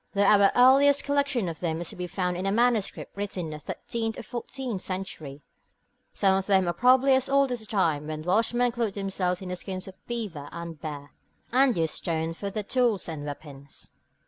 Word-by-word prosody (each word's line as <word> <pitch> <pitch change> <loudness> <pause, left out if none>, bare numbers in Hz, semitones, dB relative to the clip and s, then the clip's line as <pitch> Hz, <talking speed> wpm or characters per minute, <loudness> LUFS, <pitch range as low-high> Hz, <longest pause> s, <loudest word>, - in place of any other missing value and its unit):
Though 200 - +3
our 200 -1 +6
earliest 275 +3 +6
collection 280 -7 0
of 165 -2 -5
them 165 -2 -2
is 170 - -4
to - - -8
be 180 0 -4
found 180 0 -2
in 185 +2 -2
a - - +1
manuscript 230 -1 0
written 195 -3 -3
in - - -5
the 150 - -6
thirteenth 225 +8 -4
or - - -6
fourteenth 240 -2 -5
century, 160 -8 -5 0.7
some 195 -1 +2
of 195 - -6
them 190 -3 +3
are 175 - +1
probably 255 +6 +5
as 260 -1 +2
old 275 -1 +3
as 245 - -2
the 220 - -10
time 160 -8 0
when 155 0 -5
Welshmen 230 +7 +2
clothed 230 -4 -2
themselves 195 -2 -2
in 185 - -6
the 180 - -2
skins 185 +1 -5
of 190 - -9
the - - -32
beaver 205 -12 -5
and 170 0 -6
the 155 - -23
bear, 145 -2 -7 0.4
and 255 -2 +4
used 160 -2 0
stone 165 -1 -2
for 200 +4 -5
their 210 +1 -4
tools 235 -2 +1
and 155 -3 -5
weapons. 145 -1 -9
195 Hz, 215 wpm, -27 LUFS, 170-240 Hz, 0.7 s, our